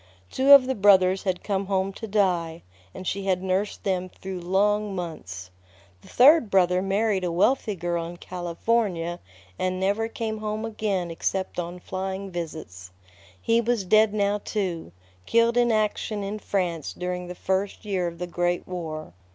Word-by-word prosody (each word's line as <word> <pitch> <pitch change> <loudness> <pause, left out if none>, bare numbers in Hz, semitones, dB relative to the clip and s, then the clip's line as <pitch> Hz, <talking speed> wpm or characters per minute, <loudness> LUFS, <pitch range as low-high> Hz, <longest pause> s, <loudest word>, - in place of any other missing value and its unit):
Two 270 +2 +3
of 280 -2 +10
the 265 - 0
brothers 190 -3 +4
had 185 -2 -1
come 195 -1 -1
home 195 0 0
to 225 - -7
die, 180 -5 0 0.3
and 185 - -9
she 195 +1 -2
had 185 -1 +1
nursed 190 +2 -1
them 185 -2 -1
through 190 0 -7
long 200 +3 +1
months. 95 - -6 0.5
The - - -17
third 270 -1 +6
brother 180 -1 +3
married 195 0 0
a 175 - -1
wealthy 210 +4 +2
girl 170 -1 -2
in 175 +1 -9
California, 175 0 -1 0.4
and 185 0 -1
never 200 +4 +1
came 220 -1 -4
home 215 +1 -3
again 205 -6 -2
except 190 +3 -2
on 175 +1 -5
flying 190 +1 -5
visits. 155 - -7 0.5
He 230 - +2
was 235 -4 0
dead 215 +3 +5
now, 205 0 +1
too, 180 - -3 0.4
killed 230 +1 +3
in 240 -1 +3
action 215 -1 0
in 205 +2 -4
France 175 -7 -2
during 180 0 -4
the 180 - -7
first 190 +3 -2
year 190 -4 -1
of 170 0 -6
the 180 - -3
Great 175 0 -1
War. 160 - -6
190 Hz, 165 wpm, -25 LUFS, 175-210 Hz, 0.5 s, of